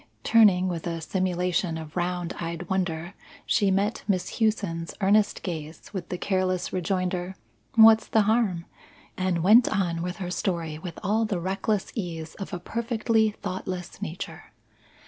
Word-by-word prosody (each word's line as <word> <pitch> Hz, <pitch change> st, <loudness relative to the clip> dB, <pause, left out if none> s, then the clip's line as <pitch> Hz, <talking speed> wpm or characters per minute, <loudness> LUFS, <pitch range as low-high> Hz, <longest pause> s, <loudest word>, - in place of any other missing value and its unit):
Turning, 200 Hz, -5 st, +5 dB
with 175 Hz, -2 st, -3 dB
a 165 Hz, -1 st, -2 dB
simulation 180 Hz, -1 st, -1 dB
of 160 Hz, -1 st, -9 dB
round 175 Hz, -1 st, -1 dB
eyed 170 Hz, 0 st, -4 dB
wonder, 175 Hz, -1 st, -1 dB, 0.3 s
she 205 Hz, -3 st, +2 dB
met 200 Hz, +3 st, 0 dB
Miss 190 Hz, +1 st, -1 dB
Hughson's 200 Hz, -7 st, 0 dB
earnest 205 Hz, +1 st, +3 dB
gaze 160 Hz, -3 st, -6 dB
with 180 Hz, -3 st, -5 dB
the 180 Hz, -, -3 dB
careless 185 Hz, -1 st, -1 dB
rejoinder, 185 Hz, 0 st, -1 dB, 0.4 s
"What's 220 Hz, 0 st, +7 dB
the 220 Hz, -, +3 dB
harm?" 205 Hz, -6 st, +1 dB, 0.5 s
and 185 Hz, -3 st, 0 dB
went 220 Hz, +6 st, +7 dB
on 175 Hz, -5 st, 0 dB
with 180 Hz, +1 st, -3 dB
her 180 Hz, -1 st, -5 dB
story 165 Hz, -5 st, -2 dB
with 170 Hz, 0 st, -7 dB
all 220 Hz, +3 st, +2 dB
the 200 Hz, -5 st, -1 dB
reckless 195 Hz, +3 st, -1 dB
ease 165 Hz, -7 st, -5 dB
of 195 Hz, -, -6 dB
a 180 Hz, -, -3 dB
perfectly 225 Hz, +2 st, +1 dB
thoughtless 185 Hz, -3 st, -6 dB
nature. 165 Hz, +4 st, -6 dB
185 Hz, 145 wpm, -26 LUFS, 170-205 Hz, 0.5 s, What's